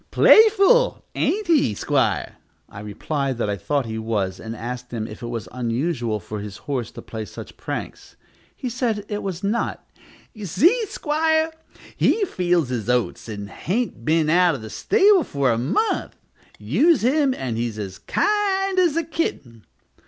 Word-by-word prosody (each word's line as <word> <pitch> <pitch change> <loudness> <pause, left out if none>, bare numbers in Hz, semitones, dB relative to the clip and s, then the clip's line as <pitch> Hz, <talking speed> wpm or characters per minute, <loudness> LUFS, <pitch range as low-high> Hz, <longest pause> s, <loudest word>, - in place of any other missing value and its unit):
"Playful, 445 +3 +5
ain't 425 +2 0
he, 305 - +3
'squire?" - - 0 0.3
I - - -11
replied 130 +6 -3
that 105 -3 -1
I - - -1
thought 140 +8 -1
he 110 0 -4
was, 105 -4 -2
and 110 +1 -6
asked 125 +2 -6
him 115 -3 -3
if 105 - -9
it 120 - -5
was 115 -2 -5
usual 120 -1 -1
for 105 +3 -7
his 100 -1 -7
horse 125 -5 -2
to - - -9
play 110 -1 -6
such 105 - -10
pranks. - - -6 0.4
He 255 - -5
said 230 -4 -1
it 205 -1 -3
was 185 -2 -5
not 210 +4 -2 0.5
"You 210 -3 -7
see, 380 - +3
'squire, 315 0 +1 0.4
he 430 - +2
feels 175 - 0
his 120 -3 -3
oats, 125 -1 0
and 100 -2 -6
hain't 190 - -3
been 155 +3 +2
out 175 0 +4
of 120 - -8
the 110 - -8
stable 405 -3 +4
for 140 - 0
a 115 - 0
month. 170 - 0 0.4
Use 225 - +2
him, 270 +1 +2
and 125 -4 -3
he's 115 -1 -3
as 95 -3 -6
kind 390 -2 +1
as 345 -5 +3
a 335 - +1
kitten." 140 - -4
150 Hz, 165 wpm, -22 LUFS, -, 0.5 s, Playful